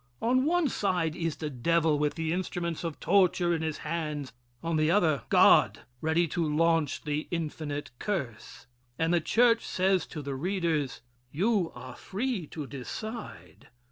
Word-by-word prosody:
On 255 +3 +2
one 345 0 +2
side 180 - 0
is 165 -2 -2
the 150 -1 -5
devil, 155 +4 +2
with 150 0 0
the 160 -1 -1
instruments 175 -2 -3
of 165 -3 -4
torture 180 -3 +3
in 165 - -1
his 160 -2 -2
hands. 150 -5 -3 0.3
On 165 0 -1
the 155 0 +2
other, 160 - +3
God, - - +5 0.2
ready 160 +2 +2
to 170 +3 -1
launch 160 -1 +1
the 150 0 -2
infinite 155 -3 -4
curse. 140 - -4 0.3
And 165 +1 +1
the 170 - +3
church 230 +6 +3
says 185 -2 +1
to 150 - -7
the 140 0 -4
readers: 160 -4 -1 0.3
"You 190 +1 +1
are 125 +1 -9
free 210 - -3
to 150 -1 -6
decide. 135 - -8
165 Hz, 155 wpm, -29 LUFS, 150-185 Hz, 0.3 s, God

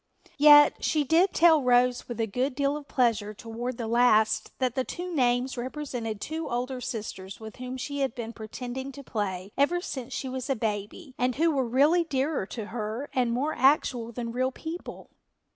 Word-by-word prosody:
Yet 295 0 +7
she 305 -2 +2
did 330 +7 +3
tell 320 -2 +5
Rose 250 -1 +3
with 240 -1 -6
a 225 - +2
good 250 +5 -2
deal 280 0 +1
of 295 -1 -8
pleasure 225 -5 +1
toward 230 +3 -5
the 235 - -3
last 220 -2 +3
that 255 -3 0
the 260 - 0
two 355 +6 -6
names 250 -2 +1
represented 245 -4 -4
two 315 +7 -4
older 250 +1 -3
sisters 210 -6 -6
with 220 -1 -10
whom 255 +1 -6
she 285 +2 -4
had 270 -4 -1
been 235 -1 -5
pretending 245 +4 -6
to 280 - -10
play 200 -5 -3
ever 335 +5 +3
since 265 -7 -6
she 265 - -3
was 260 +1 -5
a 270 - +2
baby 220 - -4
and 250 0 +1
who 330 +3 +3
were 265 -4 0
really 290 +8 +4
dearer 275 - -1
to 220 -1 -6
her 230 +4 -4
and 245 -2 +1
more 280 +6 0
actual 255 -3 +2
than 235 0 -5
real 255 +2 0
people. 325 +6 -8
255 Hz, 190 wpm, -27 LUFS, 230-280 Hz, -, Yet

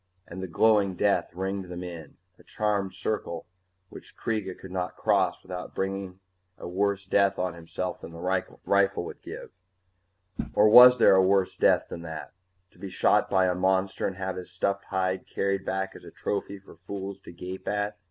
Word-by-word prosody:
And 95 +2 -7
the 95 - -4
glowing 100 +1 +3
death 100 -1 +1
ringed 95 +2 -3
them 90 0 -7
in, 85 -4 -9 0.2
a - - -17
charmed 105 -3 -1
circle 85 -6 -3 0.4
which - - -13
Kreega 105 -5 -3
could 95 - -11
not 90 -1 -3
cross - - +1
without 90 -1 -7
bringing 95 -1 -3 0.4
a - - -8
worse 100 +2 0
death 100 +1 +2
on 90 -1 -1
himself 85 +2 -5
than - - -9
the 85 - -10 0.5
rifle 100 0 +2
would - - -9
give - - -9 1.0
Or 105 +1 +6
was 125 +3 +10
there 115 - +6
a 95 - +6
worse 95 0 +2
death - - +3
than 85 - -7
that 80 -2 -7 0.4
to - - -23
be 100 +1 -6
shot 100 +3 +2
by 95 -1 +3
a 90 - +2
monster 95 +1 +1
and 95 - -4
have 95 -1 -3
his 90 - -7
stuffed 100 +2 -2
hide 95 -1 -1
carried 100 -1 -1
back 95 0 -2
as - - -12
a - - -10
trophy 100 0 -3
for 95 - -16
fools 100 -1 -7
to - - -11
gape 90 +2 -8
at? 105 0 -2
95 Hz, 185 wpm, -27 LUFS, 90-100 Hz, 1.0 s, was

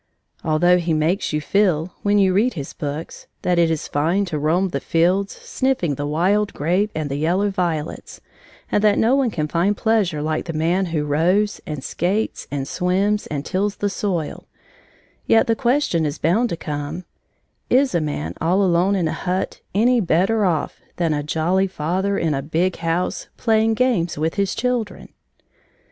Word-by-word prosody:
Although 175 +3 +3
he 170 -2 0
makes 160 +6 0
you 150 - 0
feel, 175 0 +1
when 205 0 +2
you 190 -2 +4
read 215 +4 +2
his 140 -4 -6
books, 150 +1 -6 0.2
that 180 -1 +2
it 170 -1 +4
is 160 -2 -2
fine 170 +8 +1
to 160 -5 -3
roam 170 +6 +1
the 140 - -2
fields, 180 +7 +1
sniffing 260 - -1
the 145 +1 -3
wild 190 +7 +1
grape 180 +8 +1
and 155 -1 -2
the 140 0 -3
yellow 180 +7 +1
violets, 170 -5 -3 0.5
and 210 - +2
that 210 -1 +4
no 235 +4 +3
one 270 -3 +2
can 155 -7 -2
find 180 +6 +1
pleasure 200 -9 +1
like 155 0 -1
the 165 - -4
man 170 +5 +1
who 160 -3 -1
rows, 180 +8 +1
and 150 -4 -5
skates, 195 +6 -2
and 140 -1 -3
swims, 195 +5 0
and 145 -1 -4
tills 200 +2 -1
the 205 -1 -2
soil, 180 -6 -3 0.8
yet 225 - +5
the 225 - +1
question 240 - +1
is 150 0 -2
bound 215 +10 +1
to 170 - -3
come: 150 +3 -5 0.6
"Is 265 -1 +3
a 170 - +2
man 85 - -3
all 180 +5 +2
alone 185 +2 +2
in 175 -4 +1
a - - -2
hut 185 +1 -3
any 240 +4 +4
better 195 +5 +2
off 165 -5 -1
than 165 -3 0
a 145 - -1
jolly 165 +6 +1
father 190 +3 -1
in 160 -2 0
a 135 - -1
big 165 +6 -1
house, 165 +2 -2
playing 225 -1 +2
games 215 - +1
with 160 +2 0
his 200 -2 -1
children?" 245 -3 -2
180 Hz, 180 wpm, -21 LUFS, 155-205 Hz, 0.8 s, yet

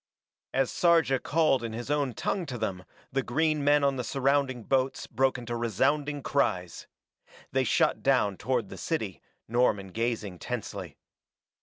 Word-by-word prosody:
As 135 -1 +1
Sarja 165 -6 +3
called 155 -6 +2
in 115 -1 -4
his 120 +5 -4
own 140 -5 0
tongue 180 -4 -2
to 125 -4 -4
them 95 -5 -3 0.3
the 135 - +1
green 155 +4 +1
men 145 0 +4
on 140 -1 +2
the 125 - -2
surrounding 135 -1 +1
boats 130 +2 0
broke 130 +3 +1
into 120 -1 -5
resounding 140 +6 0
cries. 90 -11 -1 0.6
They - - +2
shot - - +2
down 100 -2 +2
toward 120 -4 -1
the - - -9
city, 110 - -3 0.3
Norman 110 -5 +1
gazing 110 -3 -2
tensely. 100 -9 -5
125 Hz, 150 wpm, -28 LUFS, 110-140 Hz, 0.6 s, men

